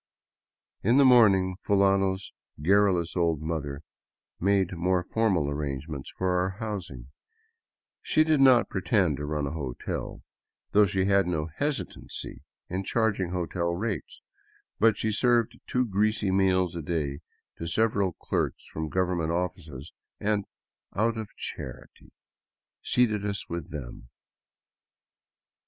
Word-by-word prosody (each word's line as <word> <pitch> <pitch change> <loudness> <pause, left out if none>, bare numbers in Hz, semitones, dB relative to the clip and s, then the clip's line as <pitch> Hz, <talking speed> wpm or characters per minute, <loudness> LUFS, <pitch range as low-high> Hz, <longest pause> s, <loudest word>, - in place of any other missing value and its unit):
In 115 +6 +3
the 140 - +6
morning 100 -7 +5
Fulano's 95 -1 +2 0.3
garrulous 90 0 +2
old 85 -4 +1
mother 75 -2 -4 0.6
made 95 -1 +2
more 90 +1 +1
formal 95 -7 +1
arrangements 70 0 -4
for 90 -1 +1
our 95 +2 -2
housing. 90 - -6 0.9
She 155 - +3
did 155 -3 +2
not 130 -4 +6
pretend 95 -5 +1
to 75 - -4
run 75 -1 -1
a 70 - -3
hotel 70 -6 -5 0.2
— - - -58
though 105 0 +5
she 95 -1 0
had 100 -1 +3
no 80 -2 -1
hesitancy 145 -1 -4 0.3
in 95 +2 -3
charging 105 -4 0
hotel 85 -1 -2
rates 100 - -4 0.3
— - - -36
but 115 +1 +4
she 110 - -1
served 120 +1 +2
two 125 0 +1
greasy 105 -1 +1
meals 95 -2 +2
a 85 - -3
day 75 -3 -2 0.4
to 85 - -5
several 100 -1 +1
clerks - - -2
from 80 - -3
the 75 - -9
government 90 -3 +1
offices 85 -5 -4 0.3
and, 105 -1 0 0.3
" - - -37
out 115 +3 +1
of 110 -2 -5
charity," - - -8 0.7
seated 110 -5 +1
us 100 -1 -3
with 85 -2 -5
them. - - -8
95 Hz, 135 wpm, -27 LUFS, 80-105 Hz, 0.9 s, the